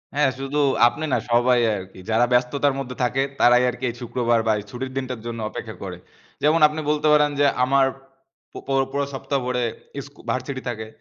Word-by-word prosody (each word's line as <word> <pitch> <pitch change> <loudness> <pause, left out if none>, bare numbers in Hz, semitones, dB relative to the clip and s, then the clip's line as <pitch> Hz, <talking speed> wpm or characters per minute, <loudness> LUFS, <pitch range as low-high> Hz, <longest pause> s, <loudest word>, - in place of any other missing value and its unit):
হ্যাঁ, 145 -1 +3
শুধু 135 +2 -2 0.3
আপনি 150 +7 -3
না - - +4
সবাই 120 +1 +4 0.2
আরকি, 95 -1 -9
যারা 115 +2 +3
ব্যস্ততার 135 +3 +2
মধ্যে 125 -2 -5
থাকে 130 +2 +1 0.2
তারাই 125 +1 +5
আরকি 125 +2 -7
এই 120 - -6
শুক্রবার 120 -1 +1
বা - - +4
এই 105 - -8
ছুটির 130 +3 -5
দিনটার 130 -4 -4
জন্য 115 -1 -5
অপেক্ষা - - -7
করে। - - -6 0.5
যেমন 155 +3 +4
আপনি 150 +1 -5
বলতে 150 0 +1
পারেন 150 0 +4
যে 145 - +5 0.2
আমার, 135 +1 +4 0.7
প - - -27
পর 135 -1 +2
পুরো 140 0 -1
সপ্তাহ 140 +1 -2
ভরে 125 -1 -1 0.4
স্কুল 140 0 -17
ভার্সিটি 130 +1 -3
থাকে। 110 -2 -5
130 Hz, 190 wpm, -23 LUFS, 120-140 Hz, 0.7 s, তারাই